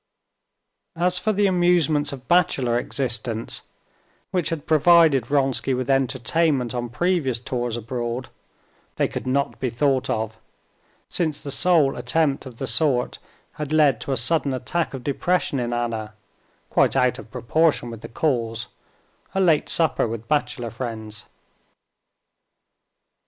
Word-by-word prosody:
As 180 +2 +1
for 215 - 0
the 205 0 +2
amusements 175 -5 +2
of 130 -2 -9
bachelor 135 -9 +2
existence, 120 -4 -2 0.7
which 180 -5 0
had 160 -3 -4
provided 155 -4 +5
Vronsky 135 -2 +1
with 130 +1 -1
entertainment 135 0 +1
on 120 -1 -3
previous 145 -3 0
tours 120 -1 -3
abroad, 120 +2 -4 0.7
they - - +1
could - - -6
not 140 +2 0
be 130 - -1
thought 135 +2 +1
of, 110 0 -2 0.7
since 155 -4 -1
the 140 - -4
sole 155 -3 +3
attempt 135 +3 0
of 120 -3 -11
the 135 - -3
sort 125 0 +1 0.4
had 150 -1 -4
led 150 -6 +3
to - - -4
a 135 - +1
sudden 140 +2 +2
attack 150 +4 -2
of 130 - -8
depression 145 +1 0
in 120 -1 -2
Anna, 115 -3 -3 0.6
quite - - +3
out 125 -1 +2
of - - -11
proportion 145 +1 +1
with 115 -2 -9
the - - -8
cause—a 120 +6 -4
late 165 -5 +3
supper 160 -7 +2
with 115 0 -6
bachelor 140 -5 -1
friends. 110 -3 -6
135 Hz, 135 wpm, -23 LUFS, 120-155 Hz, 0.7 s, provided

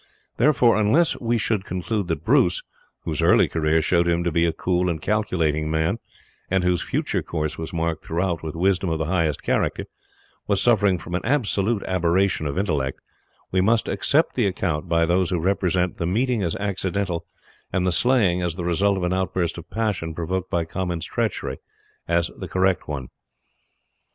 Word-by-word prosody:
Therefore, 120 -3 +4
unless 135 +10 +3
we 120 0 0
should 110 -3 0
conclude 95 +2 -3
that 80 -4 -3
Bruce - - +3 0.4
whose - - -2
early - - +5
career 80 0 +1
showed 85 +1 +2
him 85 0 +1
to 85 - 0
be 85 +1 +2
a - - +1
cool 90 +1 0
and 80 -2 -2
calculating 80 -6 0
man, 80 +7 0 0.5
and 95 -1 +1
whose 90 -1 +1
future - - -1
course 75 -2 -3
was 80 - -5
marked 80 -1 -2
throughout 85 0 -1
with 80 -1 -6
wisdom 95 +1 +1
of 80 - 0
the 80 - -2
highest 80 -4 0
character - - 0 0.6
was 100 -2 +2
suffering 105 -6 +3
from 85 +1 -9
an 90 - -1
absolute 110 -5 +1
aberration 90 -2 +1
of 70 - -4
intellect, 75 -9 -1 0.5
we 95 - +2
must 110 +3 +2
accept 155 +3 +1
the 120 -5 +1
account 90 -5 -2
by 85 0 +3
those 90 +1 +1
who 90 - 0
represent 90 0 0
the 85 - -2
meeting 120 +4 +1
as 85 -4 -1
accidental, 100 -3 -2 0.5
and 90 -1 0
the 90 - +2
slaying 95 -1 +3
as 85 -2 -1
the 90 -1 -4
result 95 +3 +2
of 95 - -3
an 90 +1 0
outburst 95 -2 -1
of 85 - -13
passion 100 -8 -2
provoked 90 +2 -3
by 85 -3 0
Comyn's 85 -1 -3
treachery, - - -2 0.5
as 85 -1 +1
the - - -5
correct 95 -1 +1
one. 70 -4 -5
90 Hz, 180 wpm, -23 LUFS, 85-100 Hz, 0.6 s, early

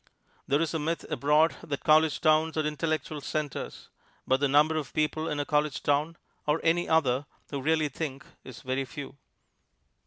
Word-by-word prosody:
There 140 - +2
is 165 - -3
a 160 - 0
myth 165 +3 -2
abroad 150 +3 +3
that 140 -3 -5
college 155 0 +4
towns 155 0 +3
are 155 - +1
intellectual 155 -1 -2
centers; 150 -1 -4 0.4
but 130 +1 +2
the 145 - +2
number 150 +3 +4
of 155 -3 -4
people 155 +1 0
in 150 - -2
a 145 - -1
college 150 -1 0
town 150 +4 +1 0.3
(or 150 +2 +2
any 170 +1 +2
other) 140 -4 +2 0.2
who 140 -2 -3
really 155 +2 +2
think, 145 0 -5 0.2
is 125 -3 -11
very 130 +1 -1
few. 140 +2 -8
150 Hz, 175 wpm, -28 LUFS, 140-160 Hz, 0.4 s, college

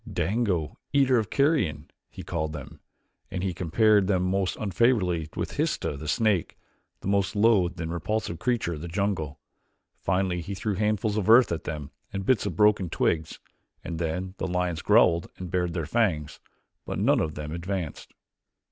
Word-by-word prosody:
"Dango, 95 -7 -1
eater 135 -3 +4
of 110 -2 -3
carrion," 105 - +1 0.2
he - - -9
called 80 -2 -3
them, 75 -4 -9 0.5
and 90 -1 -4
he 95 -2 -1
compared 100 +4 +3
them 95 -2 +2
most 95 0 0
unfavorably 95 -6 +1
with - - -4
Histah, - - -1
the 75 +3 -7
snake, 100 +1 +1 0.4
the - - -6
most 100 0 +1
loathed 100 -6 +3
and 85 0 -3
repulsive 90 -1 -2
creature 120 -7 0
of 75 - -7
the 85 - -5
jungle. 85 -5 -2 0.6
Finally 90 -1 0
he 95 +4 -5
threw 105 +2 -2
handfuls 105 +1 0
of 105 -1 0
earth 120 -1 +7
at 85 - -3
them 75 -3 -5 0.2
and 95 -1 -4
bits 110 -4 +2
of 90 - -4
broken 105 -2 +3
twigs, 80 0 0 0.5
and 85 -2 -5
then 90 +3 -2
the - - -1
lions 90 -3 -1
growled 85 +2 +4
and 90 -2 -7
bared 90 -2 0
their 80 -3 -1
fangs, 80 -9 0 0.4
but - - -4
none - - +3
of 75 -1 -2
them 75 0 -5
advanced. 85 -1 -4
90 Hz, 170 wpm, -27 LUFS, 80-105 Hz, 0.6 s, earth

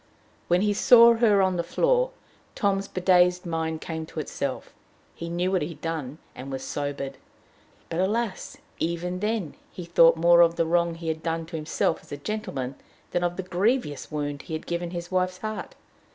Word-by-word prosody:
When 175 +1 +3
he 205 0 +2
saw 235 +2 +7
her 215 -4 +4
on 185 -1 +1
the 170 - 0
floor, - - +2 0.5
Tom's 195 -1 0
bedazed 180 -1 +3
mind 160 -1 -2
came 160 -1 -5
to 160 - -6
itself; 140 -2 -4 0.4
he 170 - -7
knew 175 +2 -1
what 185 - +1
he 150 - -1
had 165 - -10
done, 155 -4 -4 0.2
and 135 +2 -8
was 135 0 -4
sobered. 140 -1 -4 0.7
But, 165 - -3
alas! 210 +2 -1 0.2
even 170 +2 -2
then 210 -6 -2 0.2
he 180 - -8
thought 165 -1 +5
more 170 +1 +6
of 170 0 +5
the 165 - +1
wrong 170 0 +1
he 165 0 -8
had 160 0 -3
done 165 0 -2
to 165 +1 -8
himself 160 +1 0
as - - -20
a 145 - -4
gentleman 140 -8 -4 0.3
than 175 - 0
of 175 0 -1
the 190 - -3
grievous 185 - 0
wound 145 -1 -3
he - - -9
had 155 - -4
given 170 0 -3
his 175 0 -6
wife's 185 0 0
heart. 215 +2 -6
170 Hz, 190 wpm, -26 LUFS, 160-190 Hz, 0.7 s, saw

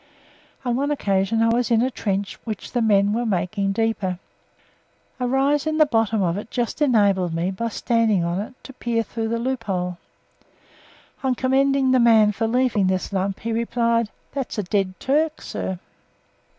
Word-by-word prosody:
On 245 -1 +1
one 280 +3 0
occasion 205 -5 +1
I 230 - +3
was 240 +1 +1
in 230 0 +3
a 260 - 0
trench 200 -4 -3
which 220 -3 -6
the 245 - 0
men 205 -2 +3
were 235 +2 0
making 195 -1 -1
deeper. 210 -4 -1 1.0
A 250 - 0
rise 275 +3 +1
in 310 0 0
the 310 - +6
bottom 225 -5 +1
of 175 +2 0
it 210 - -9
just 240 +4 -3
enabled 200 - +3
me, 175 +3 -1
by 230 +5 -3
standing 225 -4 +1
on 170 +2 -1
it, 215 +5 -6
to 270 - -10
peer 235 -2 -1
through 225 0 -4
the 230 +1 -1
loophole. 200 -8 -2 1.2
On 260 -3 +1
commending 265 +1 +2
the 260 - +4
man 225 -3 +5
for 225 +2 -1
leaving 240 -4 +2
this 185 +1 -1
lump, 195 0 -1
he 230 - -3
replied, 230 -1 +1 0.2
"That's 270 -4 -4
a 210 - 0
dead 190 0 -1
Turk, 305 +3 +1
sir!" 190 - -4
225 Hz, 175 wpm, -22 LUFS, 195-250 Hz, 1.2 s, the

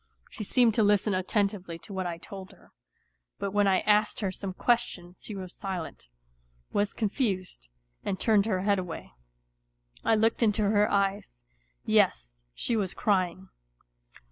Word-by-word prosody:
She 215 - -6
seemed 235 +2 +3
to 220 - +3
listen 205 0 +3
attentively 185 -2 -1
to 200 - -10
what 190 -1 -2
I 170 -1 -4
told 190 +1 -9
her; - - -22 0.7
but 200 - -3
when 205 0 +3
I 190 -1 +3
asked 210 0 +2
her 195 -3 0
some 190 +1 -5
question 185 -4 0
she 210 - -7
was 185 -2 -7
silent, 185 - -6 0.7
was 205 0 +1
confused, 195 - -2 0.4
and 190 - -2
turned 215 -2 +3
her 190 -4 0
head 200 0 +2
away. 180 - -6 0.9
I 225 - +4
looked 225 +2 +2
into 215 -1 +3
her 205 +1 +3
eyes 195 - -1 0.4
yes, - - +2 0.2
she 235 - -1
was 195 -5 -1
crying. 185 -3 0
200 Hz, 150 wpm, -28 LUFS, 185-210 Hz, 0.9 s, I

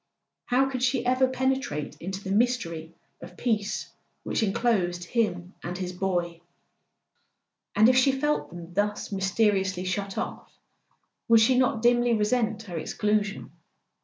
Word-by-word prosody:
How 255 +2 +2
could 260 -2 -4
she 255 0 +1
ever 255 +1 +3
penetrate 260 - -1
into 190 +3 -5
the 190 - -4
mystery 195 -8 0 0.3
of 175 +1 -11
peace 215 -4 -1 0.3
which - - -1
enclosed 195 -5 +1
him 180 -3 -1
and 175 +1 -5
his 180 -1 -4
boy? 175 -2 -2 1.3
And 215 +2 +6
if 255 - +5
she 260 +1 +5
felt 295 +3 -1
them 175 0 -10
thus 205 +2 -1
mysteriously 195 -1 +1
shut 195 +1 -3
off - - -5 0.8
would 230 -1 +7
she 230 +4 +4
not 250 -3 +2
dimly 240 0 +4
resent 220 0 0
her 175 -6 -5
exclusion? 210 +4 -1
210 Hz, 135 wpm, -27 LUFS, 180-245 Hz, 1.3 s, would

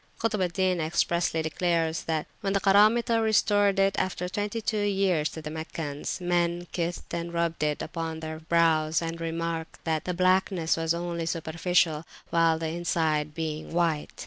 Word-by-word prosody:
Kutb 220 -3 0
al 180 - +3
Din 180 0 0
expressly 165 0 0
declares 165 0 0
that, 160 -2 -1
when 195 -3 -1
the 195 - +2
Karamitah 215 +4 +4
restored 205 -2 +3
it 195 0 +3
after 180 -1 -2
twenty 205 +4 -2
two 215 -1 -1
years 195 -6 +1
to 160 - -8
the 150 - -5
Meccans, 160 -2 -4
men 175 -1 0
kissed 175 0 -3
it - - 0
and 170 0 -4
rubbed 170 -1 -1
it 150 -1 0
upon 160 -1 -4
their 160 0 -6
brows; 160 -1 +2
and 165 0 -4
remarked 165 0 -3
that 160 -2 -1
the 180 - -2
blackness 185 -2 +2
was 165 0 0
only 170 -1 -3
superficial, 165 -1 +1 0.3
the 165 -1 +3
inside 160 -2 0
being 155 -1 -4
white. 165 -3 +1
170 Hz, 165 wpm, -27 LUFS, 160-185 Hz, 0.3 s, Karamitah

